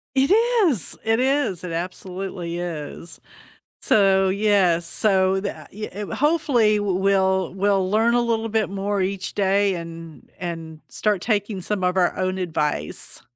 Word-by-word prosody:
It 270 +6 +3 0.4
is, 235 - 0
it 225 +1 +1
is, 265 - 0
it 175 - -5
absolutely 180 0 -5
is. 165 -1 -6 0.6
So, 195 -2 +4
yeah, 195 -4 +3
so 190 +2 +1
tha 200 - -6
i 215 +2 -5 0.2
w - - -6
hopefully, 265 -8 +2
we'll 190 -2 +1
we'll 195 -1 +1
learn 225 +3 +3
a 240 - +4
little 225 -1 0
bit 220 0 +1
more 200 +1 -2
each 190 0 -3
day 200 0 +2
and 165 -2 -9
and 165 -3 -6
start 210 -4 0
taking 205 -3 -1
some 200 0 -2
of 180 +1 +1
our 180 -2 +2
own 185 0 -1
advice. 150 - -2
195 Hz, 145 wpm, -22 LUFS, 180-210 Hz, 0.6 s, So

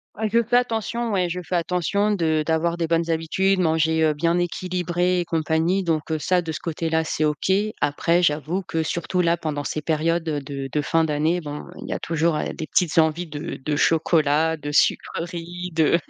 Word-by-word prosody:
Ah! 220 +1 -1
Je 235 0 +4
fais 245 +2 +2
attention, 235 -1 -1
ouais. 185 -3 +1
Je 175 +1 -3
fais 180 +1 -4
attention 180 +5 0
de 160 -5 +1
d'avoir 165 +1 0
des 170 - 0
bonnes 165 0 +1
habitudes, 185 +4 +1
manger, 160 -1 +2
heu, 155 -1 +3
bien 165 +3 +1
équilibré 180 0 0
et - - -4
compagnie 165 +3 +1
donc 160 -2 -1
heu, 155 - 0
ça, 180 +2 +1
de 160 - -4
ce - - -5
côté-là, 160 -1 -1
c'est 155 -1 -1
OK. 150 +4 0 0.3
Après, 165 +4 +2
j'avoue 155 +3 0
que, 165 -2 -2
surtout, 170 +3 -1
là, 170 0 +2
pendant 150 -3 -3
ces 155 +2 -3
périodes, 165 +2 0
heu, 150 - -1
de 135 -1 -6
de 150 - 0
fin 165 +4 +2
d'année, 160 +3 0
bon, 145 -1 -6
heu, - - -13
il - - -8
y - - -1
a - - -3
toujours, 165 0 0
allez, - - -2
des 155 - -6
petites 170 -2 +2
envies 160 +2 +2
de 150 -2 -6
de 150 - 0
chocolat, 160 0 +2
de 145 -1 -6
sucreries, 175 +3 -1
de 160 +1 +3
165 Hz, 210 wpm, -23 LUFS, 155-175 Hz, 0.3 s, Je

